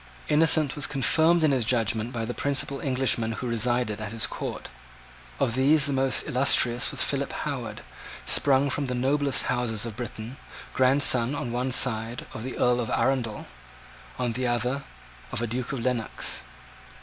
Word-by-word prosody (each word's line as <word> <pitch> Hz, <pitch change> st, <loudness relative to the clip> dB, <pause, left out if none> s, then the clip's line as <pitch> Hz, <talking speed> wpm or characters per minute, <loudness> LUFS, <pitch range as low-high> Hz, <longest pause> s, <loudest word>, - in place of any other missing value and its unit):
Innocent 155 Hz, -1 st, +3 dB
was 145 Hz, -, +1 dB
confirmed 160 Hz, +5 st, +2 dB
in 155 Hz, -, +4 dB
his 130 Hz, -3 st, +1 dB
judgment 115 Hz, 0 st, 0 dB
by 115 Hz, -3 st, -3 dB
the 120 Hz, -, -4 dB
principal 140 Hz, 0 st, -1 dB
Englishmen 130 Hz, -4 st, 0 dB
who 110 Hz, -, -6 dB
resided 115 Hz, -2 st, -1 dB
at 105 Hz, -2 st, -5 dB
his 115 Hz, -1 st, +1 dB
court. -, -, -6 dB, 0.7 s
Of 125 Hz, -4 st, +1 dB
these 140 Hz, +4 st, +4 dB
the 140 Hz, -, +1 dB
most 135 Hz, 0 st, +2 dB
illustrious 125 Hz, -1 st, +3 dB
was -, -, +1 dB
Philip 140 Hz, 0 st, -2 dB
Howard, 125 Hz, -8 st, -5 dB, 0.4 s
sprung 140 Hz, 0 st, +3 dB
from 140 Hz, +1 st, -2 dB
the 125 Hz, -, -2 dB
noblest 140 Hz, +2 st, +2 dB
houses 115 Hz, -3 st, 0 dB
of 115 Hz, -3 st, -6 dB
Britain, 120 Hz, +1 st, -7 dB, 0.4 s
grandson, 130 Hz, -1 st, +4 dB
on 120 Hz, -4 st, -4 dB
one 125 Hz, +2 st, -2 dB
side, 120 Hz, -2 st, +1 dB
of 110 Hz, -, -6 dB
an 130 Hz, -, -5 dB
Earl 125 Hz, 0 st, +2 dB
of 115 Hz, -, -3 dB
Arundel, 125 Hz, -5 st, -1 dB, 0.7 s
on 125 Hz, -2 st, -1 dB
the 125 Hz, +2 st, -2 dB
other, 125 Hz, +3 st, -1 dB, 0.5 s
of -, -, -1 dB
a 120 Hz, -, -1 dB
Duke 120 Hz, +2 st, -4 dB
of 130 Hz, -3 st, -4 dB
Lennox. 125 Hz, -3 st, -2 dB
125 Hz, 165 wpm, -26 LUFS, 115-135 Hz, 0.7 s, in